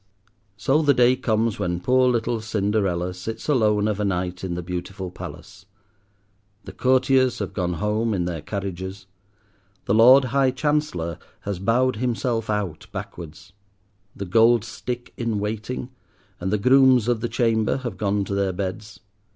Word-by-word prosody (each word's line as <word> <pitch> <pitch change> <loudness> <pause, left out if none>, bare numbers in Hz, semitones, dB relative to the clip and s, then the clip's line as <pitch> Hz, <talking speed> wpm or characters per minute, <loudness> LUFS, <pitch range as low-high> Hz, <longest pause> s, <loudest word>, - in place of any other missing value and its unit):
So 140 +8 +2
the 145 -3 +3
day 125 +1 +5
comes 110 -2 0
when 90 0 -1
poor 130 +6 +3
little 115 -1 0
Cinderella 100 -4 -1
sits 110 +5 -7
alone 105 -7 +2
of 105 -1 -1
a - - 0
night 90 -2 -2
in 90 -2 -3
the 90 - -4
beautiful 90 +1 -5
palace. 100 +2 -10 1.0
The - - -9
courtiers 130 0 +2
have - - -4
gone 90 -2 -1
home 105 +5 0
in 90 -2 -1
their 85 -3 -4
carriages. 95 0 -5 0.8
The - - +1
Lord 125 +5 +7
High 135 -1 +4
Chancellor 130 - -1 0.2
has 100 -3 -4
bowed 120 +4 +1
himself 115 -1 -1
out 100 -7 -3
backwards. 85 +3 -9 0.6
The 100 - -5
Gold 115 +4 +4
Stick 120 +1 -6
in 115 -3 -1
Waiting 110 +5 -4 0.5
and 95 +2 -2
the 105 - +2
Grooms 130 +1 +5
of 120 -2 +1
the 120 - -2
Chamber 115 -1 +1
have 125 -4 -5
gone 100 -1 0
to 100 - -4
their 100 -1 0
beds. 95 +2 -5
105 Hz, 155 wpm, -23 LUFS, 95-125 Hz, 1.0 s, Lord